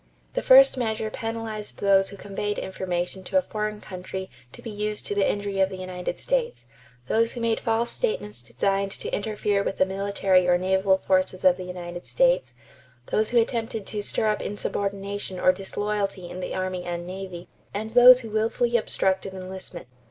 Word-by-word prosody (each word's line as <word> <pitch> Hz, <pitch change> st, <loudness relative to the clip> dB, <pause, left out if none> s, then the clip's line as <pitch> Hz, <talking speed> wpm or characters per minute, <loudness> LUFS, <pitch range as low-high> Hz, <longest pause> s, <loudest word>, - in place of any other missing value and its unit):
The -, -, 0 dB
first 270 Hz, +1 st, +7 dB
measure 220 Hz, -2 st, -1 dB
penalized 225 Hz, -2 st, -5 dB
those 195 Hz, -1 st, +3 dB
who 200 Hz, -, -10 dB
conveyed 205 Hz, +1 st, -3 dB
information 185 Hz, 0 st, -3 dB
to 285 Hz, -, +1 dB
a -, -, +5 dB
foreign 215 Hz, -2 st, -3 dB
country 190 Hz, 0 st, -7 dB, 0.2 s
to -, -, -14 dB
be 230 Hz, -, -6 dB
used 210 Hz, 0 st, -3 dB
to -, -, -2 dB
the 200 Hz, -1 st, +2 dB
injury 200 Hz, -1 st, -2 dB
of 190 Hz, 0 st, +4 dB
the 190 Hz, -, -7 dB
United 185 Hz, -1 st, -4 dB
States; -, -, -1 dB, 0.4 s
those 230 Hz, +1 st, +2 dB
who 245 Hz, -, -6 dB
made 230 Hz, -1 st, +1 dB
false 230 Hz, +1 st, +1 dB
statements 430 Hz, -, -2 dB
designed 195 Hz, 0 st, 0 dB
to -, -, -6 dB
interfere 205 Hz, -1 st, 0 dB
with 195 Hz, -, -3 dB
the 185 Hz, -, +4 dB
military 195 Hz, -1 st, +2 dB
or 175 Hz, 0 st, +5 dB
naval 190 Hz, +1 st, +2 dB
forces 185 Hz, -1 st, 0 dB
of 185 Hz, -1 st, +7 dB
the 185 Hz, -, -6 dB
United 175 Hz, -1 st, -7 dB
States; -, -, +2 dB, 0.6 s
those 215 Hz, 0 st, +2 dB
who 240 Hz, -, +1 dB
attempted 225 Hz, -2 st, -1 dB
to 210 Hz, -, -3 dB
stir 205 Hz, -, 0 dB
up 210 Hz, -, 0 dB
insubordination 200 Hz, -1 st, -3 dB
or 185 Hz, -, +5 dB
disloyalty 195 Hz, 0 st, -2 dB
in 180 Hz, -, -6 dB
the 185 Hz, -, -4 dB
army 185 Hz, -1 st, -2 dB
and 175 Hz, -1 st, -4 dB
navy; 185 Hz, -1 st, -7 dB, 0.2 s
and 220 Hz, +2 st, -4 dB
those 250 Hz, +1 st, +9 dB
who 225 Hz, -3 st, -8 dB
willfully 230 Hz, +2 st, +1 dB
obstructed 190 Hz, -3 st, -1 dB
enlistment. 185 Hz, -1 st, -6 dB
200 Hz, 180 wpm, -25 LUFS, 185-220 Hz, 0.6 s, those